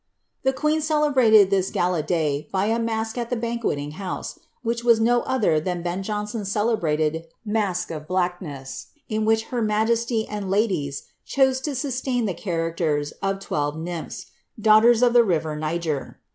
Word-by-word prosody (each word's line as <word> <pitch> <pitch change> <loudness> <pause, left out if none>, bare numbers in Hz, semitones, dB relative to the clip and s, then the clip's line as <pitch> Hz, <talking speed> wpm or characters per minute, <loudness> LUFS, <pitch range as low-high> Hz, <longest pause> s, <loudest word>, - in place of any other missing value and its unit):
* - - -51
The 265 - +2
queen 305 +3 0
celebrated 265 -10 +4
lilts 190 -1 +2
gala 175 -2 +1
day 150 -3 -1
by 190 0 +1
a 225 +2 +1
masque 225 0 -2
at 235 -1 -3
the 245 - 0
banqiietin: 225 -11 -2
house, 185 +3 -6 0.2
which 235 0 -1
was 235 -2 +5
no 240 +2 +3
other 210 -12 +2
than 175 +1 -3
Ben 175 +2 -2
Jonson's 210 0 -3
celebrated 165 -7 0 0.2
masque 205 -4 -1
l1 155 -1 -6
'■Blackness," 175 -7 -3 0.2
in 215 -1 0
which 220 0 +3
her 245 - 0
majesiv 225 +1 +1
and 205 -2 -4
ladies 185 -9 0 0.2
chose 265 -1 +2
to 285 0 -3
sustain 255 -2 -1
ihec!;i 190 0 -4
raciers 165 -3 -1
of 195 0 -1
twelve 145 -4 -2
nymphs, 170 0 -5 0.3
daughters 220 +3 +6
of 240 -1 +4
the 240 -1 +7
river 160 -6 0
Xiger. 155 -1 -3
205 Hz, 160 wpm, -24 LUFS, 165-235 Hz, 0.3 s, the